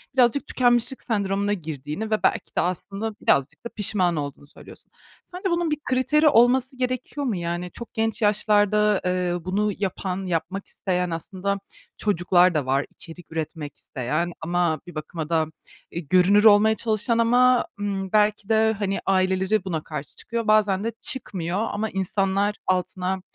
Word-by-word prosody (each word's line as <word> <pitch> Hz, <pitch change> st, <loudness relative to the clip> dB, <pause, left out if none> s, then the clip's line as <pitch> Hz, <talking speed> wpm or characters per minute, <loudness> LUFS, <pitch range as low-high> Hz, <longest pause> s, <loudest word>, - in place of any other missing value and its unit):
birazcık 255 Hz, +3 st, +3 dB
tükenmişlik 245 Hz, +1 st, +2 dB
sendromuna 200 Hz, -2 st, 0 dB
girdiğini 155 Hz, +4 st, -5 dB
ve 215 Hz, -, 0 dB
belki -, -, 0 dB
de -, -, +4 dB
aslında 195 Hz, +5 st, -3 dB
birazcık 140 Hz, -, +1 dB
da -, -, -3 dB
pişman 185 Hz, -4 st, +1 dB
olduğunu 145 Hz, -1 st, -5 dB
söylüyorsun. -, -, -15 dB, 0.3 s
Sence 370 Hz, +2 st, -4 dB
bunun 340 Hz, -2 st, 0 dB
bir 300 Hz, -, +1 dB
kriteri 295 Hz, +4 st, +3 dB
olması 255 Hz, +1 st, +3 dB
gerekiyor 255 Hz, +3 st, -3 dB
mu? 235 Hz, -6 st, 0 dB
Yani 175 Hz, 0 st, -3 dB
çok 235 Hz, -, -10 dB
genç 225 Hz, 0 st, -1 dB
yaşlarda, 210 Hz, 0 st, +3 dB
eee, 180 Hz, -1 st, 0 dB
bunu 205 Hz, +3 st, 0 dB
yapan, 190 Hz, -1 st, -3 dB
yapmak 180 Hz, +3 st, -3 dB
isteyen 180 Hz, -2 st, -2 dB
aslında 190 Hz, +4 st, -3 dB, 0.4 s
çocuklar 180 Hz, -2 st, +3 dB
da 150 Hz, -4 st, 0 dB
var, 135 Hz, +2 st, +1 dB
içerik 175 Hz, 0 st, -10 dB
üretmek 160 Hz, -2 st, -5 dB
isteyen 155 Hz, +8 st, -3 dB
ama 170 Hz, -1 st, 0 dB
bir 175 Hz, -, -11 dB
bakıma 155 Hz, +1 st, -5 dB
da, 160 Hz, -2 st, +2 dB, 0.5 s
eee, 170 Hz, -, -4 dB
görünür 185 Hz, +3 st, +5 dB
olmaya 215 Hz, 0 st, +6 dB
çalışan 220 Hz, +1 st, 0 dB
ama, 245 Hz, +2 st, +4 dB
ımm, 195 Hz, -2 st, -3 dB
belki 210 Hz, -1 st, +2 dB
de, 220 Hz, 0 st, +3 dB
hani, 195 Hz, -1 st, -1 dB
aileleri 190 Hz, +1 st, +1 dB
buna 160 Hz, -4 st, -3 dB
karşı 150 Hz, -2 st, -7 dB
çıkıyor, 230 Hz, -1 st, -4 dB
bazen 210 Hz, -2 st, +3 dB
de 230 Hz, -, -1 dB
çıkmıyor 200 Hz, -, -2 dB
ama 220 Hz, -1 st, -2 dB
insanlar 195 Hz, +2 st, 0 dB
altına 185 Hz, 0 st, -1 dB
195 Hz, 150 wpm, -24 LUFS, 175-220 Hz, 0.5 s, olmaya